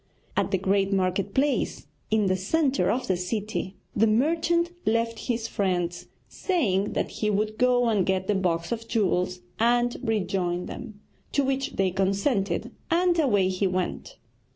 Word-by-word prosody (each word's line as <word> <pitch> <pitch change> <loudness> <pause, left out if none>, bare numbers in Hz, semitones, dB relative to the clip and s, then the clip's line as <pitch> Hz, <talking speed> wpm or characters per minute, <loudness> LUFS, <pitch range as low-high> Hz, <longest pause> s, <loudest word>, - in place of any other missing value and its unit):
At - - +1
the 190 - +1
great 195 +1 +1
market 190 +1 0
place 280 +1 0 0.2
in 215 -1 +2
the 185 -1 +2
centre 275 - +1
of 255 +2 0
the 185 - +1
city 195 +1 -3 0.2
the 225 +2 +4
merchant 330 +9 +2
left 230 0 0
his 230 -2 -1
friends, 175 -4 -1 0.2
saying 210 - 0
that - - -1
he 215 - -1
would 215 +1 -1
go 245 -1 +4
and 210 -4 +2
get 190 0 0
the 210 - +1
box 175 -2 0
of 230 -1 -3
jewels 185 -5 0 0.2
and 240 +1 +3
rejoin 190 -6 -1
them, 220 -5 -8 0.3
to 280 - +3
which 270 +1 -1
they 190 -1 +1
consented, 195 +2 0 0.2
and 345 0 +3
away 205 -11 +3
he 185 +1 0
went. 185 - -3
210 Hz, 155 wpm, -26 LUFS, 190-245 Hz, 0.3 s, the